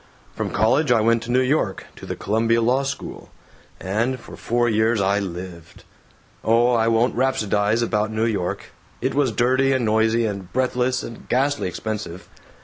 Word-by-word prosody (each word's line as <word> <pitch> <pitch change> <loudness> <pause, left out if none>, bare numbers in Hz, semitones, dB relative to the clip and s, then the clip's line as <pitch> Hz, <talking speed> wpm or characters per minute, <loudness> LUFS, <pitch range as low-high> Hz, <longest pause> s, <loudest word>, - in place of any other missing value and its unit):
From - - -3
college 125 +7 +2
I 120 - +5
went 115 +1 +2
to 120 - -5
New 130 +1 +3
York, 130 -7 0
to - - -10
the - - -4
Columbia 115 +2 +1
Law 125 +4 +2
School. 140 0 -6 0.5
And 115 +7 -1
for - - -12
four 120 +1 0
years 110 0 +2
I 100 +1 +2
lived. 90 -3 -8 0.6
Oh, 115 +2 +3
I 115 -1 +2
won't 115 +2 +2
rhapsodize 110 -3 +1
about 110 -1 0
New 110 +1 0
York. 100 -6 -3 0.3
It 130 +2 -1
was 140 -3 +1
dirty 130 +4 +2
and 130 -3 0
noisy 110 +1 +2
and 100 -4 -5
breathless 125 0 0
and 115 - -10
ghastly 140 -1 +1
expensive. 105 -2 -5
115 Hz, 165 wpm, -22 LUFS, 105-125 Hz, 0.6 s, I